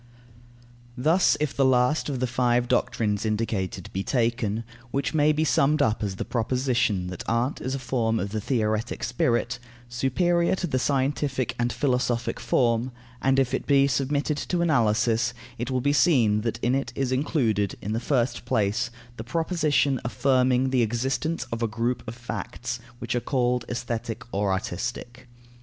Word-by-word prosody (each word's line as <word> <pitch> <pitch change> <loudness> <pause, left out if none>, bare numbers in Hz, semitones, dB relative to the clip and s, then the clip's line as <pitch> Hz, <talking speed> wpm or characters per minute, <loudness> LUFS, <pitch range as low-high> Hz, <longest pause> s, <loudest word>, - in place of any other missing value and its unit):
Thus, 160 +8 +3
if 150 -2 -1
the 140 - +2
last 130 +4 +3
of 135 -3 -2
the 130 - +1
five 120 0 +1
doctrines 110 -4 0
indicated 105 -4 -2
be 95 - -1
taken, 115 -2 0 0.3
which 140 +5 -1
may 150 -1 +4
be 155 +1 +1
summed 150 -1 +3
up 110 0 +2
as 100 -3 -2
the - - -4
proposition 120 -4 0
that 90 - -6
art 120 +4 0
is 130 +1 -2
a - - -1
form 115 -3 0
of 100 +1 -3
the 110 0 -2
theoretic 110 -2 -1
spirit, 120 +1 0 0.3
superior 170 +9 +1
to 185 - -2
the 135 -6 0
scientific 135 -2 0
and 120 0 +1
philosophic 125 -1 0
form 120 0 +1 0.3
and 135 0 +3
if 135 -2 +2
it - - -2
be 140 -1 +5
submitted 140 +2 0
to 170 +3 -1
analysis, 115 -4 +2 0.2
it 120 +2 -2
will 130 -1 0
be 145 +2 +2
seen 125 -10 +4
that 115 +1 -2
in 120 - +2
it 135 +1 -1
is 135 -2 -1
included, 120 - +1
in 105 - -4
the 115 - 0
first 125 0 0
place, 110 +1 0 0.3
the 110 - -5
proposition 150 -1 +1
affirming 130 +2 +2
the 130 -2 +3
existence 130 +8 -1
of 115 0 -3
a 115 - +2
group 120 +3 -1
of 115 - -5
facts, 120 0 -5 0.2
which 120 -1 -4
are 120 - +1
called 125 -1 0
aesthetic 120 -1 -4
or 100 0 +1
artistic. 120 +6 -4
125 Hz, 165 wpm, -25 LUFS, 115-135 Hz, 0.3 s, be